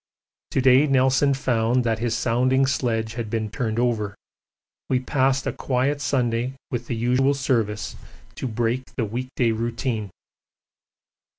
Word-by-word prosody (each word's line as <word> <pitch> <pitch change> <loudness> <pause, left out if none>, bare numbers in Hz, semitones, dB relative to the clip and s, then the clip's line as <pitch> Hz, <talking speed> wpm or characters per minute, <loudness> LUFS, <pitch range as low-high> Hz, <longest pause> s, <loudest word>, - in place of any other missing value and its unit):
To 135 - 0
day 130 +3 +5
Nelson 135 +1 +3
found 120 -1 +1
that 115 -2 0
his 120 0 0
sounding 130 +3 +2
sledge 115 -4 -1
had 115 -2 -4
been 110 -1 -2
turned 110 -1 -2
over. 110 -4 0 0.7
We 130 - +2
passed 130 +1 +1
a - - -1
quiet 140 +3 0
Sunday 125 -2 0 0.2
with 120 -2 -3
the 120 - -2
usual 125 +4 +2
Service 115 -6 -1 0.4
to - - -4
break 120 +2 -2
the 120 - 0
week 120 +5 -4
day 120 -3 +2
routine. 115 -1 -2
125 Hz, 140 wpm, -24 LUFS, 115-130 Hz, 0.7 s, day